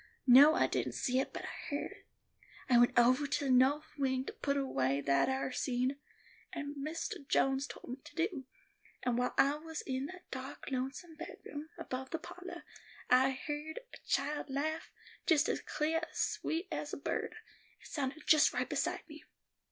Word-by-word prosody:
No, 280 +5 +9
I - - +4
didn't - - -1
see 255 0 +1
it, 265 - -1
but - - -6
I - - -7
heerd 290 -1 -2
it. - - -15 0.6
I 245 -2 +6
went 240 0 +4
ovah 255 +4 +5
to 285 0 0
the 265 - +2
noth 270 +4 +5
wing 260 -1 +1
to - - -5
put 280 0 -1
away 140 - +1
that 140 - +3
ar 265 0 -1
seed, 255 +1 0 0.6
as 290 - -3
Mistah 305 +4 -4
Jones 270 +1 +2
told - - -10
me 250 - -5
to 295 - -13
do, 330 -5 -1 0.6
and 245 -2 +1
while 250 - 0
I 280 +2 +4
was 320 +1 -6
in 265 +1 -2
that 365 +2 -12
dark, 265 +1 -6
lonesome 270 +6 -4
bedroom 310 -2 -8
above 265 -5 -5
the 325 - -2
pahlor, 360 +3 -9 0.5
I 260 +1 +6 0.2
heerd 305 +7 -4
a - - -8
child 295 +1 0
laugh, 305 +4 -2 0.4
just 315 -5 +5
as - - 0
cleah 315 +2 0
and - - -19
sweet 335 +4 -1
as 300 -1 -3
a - - -2
bird; 280 - -2 0.4
it - - -18
sounded 290 0 -3
just 310 -1 +6
right - - 0
beside - - -1
me. 300 -1 -11
280 Hz, 185 wpm, -34 LUFS, 260-310 Hz, 0.6 s, No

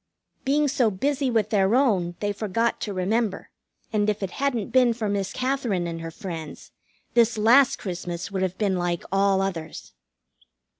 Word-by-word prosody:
Being 290 +2 +2
so 255 -4 +2
busy 270 +7 -1
with 220 -3 0
their 200 +1 +3
own 195 -10 +2
they 205 0 0
forgot 220 +3 -1
to 210 - -3
remember, 200 +3 -1 0.4
and 210 0 +2
if 210 -1 -2
it 190 - -3
hadn't 255 -7 -2
been 250 -2 +4
for 225 -2 -3
Miss 200 -1 -1
Katherine 255 -8 -1
and 165 -1 -5
her 165 - -5
friends 165 -2 -8 0.4
this 235 -1 +3
last 245 +5 +5
Christmas 175 -1 -5
would 190 -1 -2
have 185 0 -1
been 200 -3 +1
like 175 -1 -1
all 195 0 +3
others. 170 -5 -5
205 Hz, 165 wpm, -25 LUFS, 185-235 Hz, 0.4 s, last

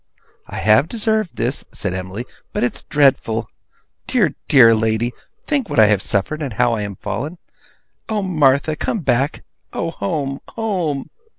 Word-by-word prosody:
'I - - -8
have 110 +9 +4
deserved 220 -4 0
this,' 125 +4 -1
said 95 -3 -3
Emily, 95 +5 -5 0.3
'but - - 0
it's 120 - -1
dreadful! 135 -6 +2 0.6
Dear, - - +2
dear 115 -5 +7
lady, 110 +2 0 0.3
think 280 -7 0
what - - -3
I 110 - +8
have 105 -2 +3
suffered, 105 +13 -1
and 135 -6 -3
how 120 +2 +2
I 110 - -1
am 100 -1 -4
fallen! 115 - -4 0.7
Oh, 215 -2 0
Martha, 155 -4 +3
come 210 +7 -2
back! 135 +1 0 0.3
Oh, 165 - -2
home, 145 -6 -3 0.2
home! 180 -11 -2
135 Hz, 155 wpm, -20 LUFS, 110-165 Hz, 0.7 s, I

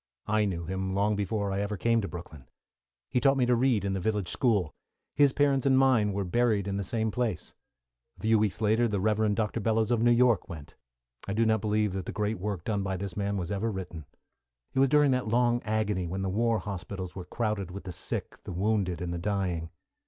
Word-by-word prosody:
I 110 0 +2
knew 85 -4 -3
him 95 +2 -3
long 105 +2 +2
before 100 0 -1
I 95 - -1
ever 105 0 -2
came 115 +3 +2
to 100 - -3
Brooklyn. 80 -7 -9 0.6
He 125 - +2
taught 135 +1 +3
me 125 - +3
to 125 - +3
read 120 -5 +2
in 100 - 0
the 95 - -1
village 105 -2 -1
school. 100 - +1 0.4
His 145 -1 +5
parents 140 -1 +2
and 130 -1 +5
mine 130 -6 +4
were 100 0 -1
buried 105 0 +1
in 100 0 -2
the 100 - -2
same 110 +2 -1
place. 115 -7 -2 0.6
A - - -16
few 110 0 +4
weeks 105 -1 -1
later, 110 +2 +3
the 105 -3 -1
Rev. 105 +1 +1
Dr. 110 +2 -1
Bellows 110 +1 +1
of 120 -2 +2
New 120 - +4
York 120 -3 +3
went. 75 -5 -9 0.5
I 100 - -2
do 115 +2 +2
not 110 -1 +2
believe 105 -2 +1
that 95 -1 -4
the - - -3
great 105 0 -2
work 100 -3 -3
done 105 -1 -1
by 95 -1 -2
this 100 0 -5
good - - -5
man 100 0 -1
was 90 -1 -3
ever 100 +3 -1
written. 85 -5 -6 0.7
It - - 0
was 135 0 +5
during 150 -1 +4
that 125 -2 0
long 120 +1 +2
agony 105 -4 0
when 95 +3 -3
the 95 - -1
war 115 +3 +1
hospitals 95 -2 -6
were 90 -2 -6
crowded 105 -1 -2
with 100 +2 -8
the 95 - -6
sick, - - -5
the - - -7
wounded, 95 -3 0
and 85 -1 -3
the 85 - -3
dying. 90 -4 -2
105 Hz, 230 wpm, -28 LUFS, 95-115 Hz, 0.7 s, His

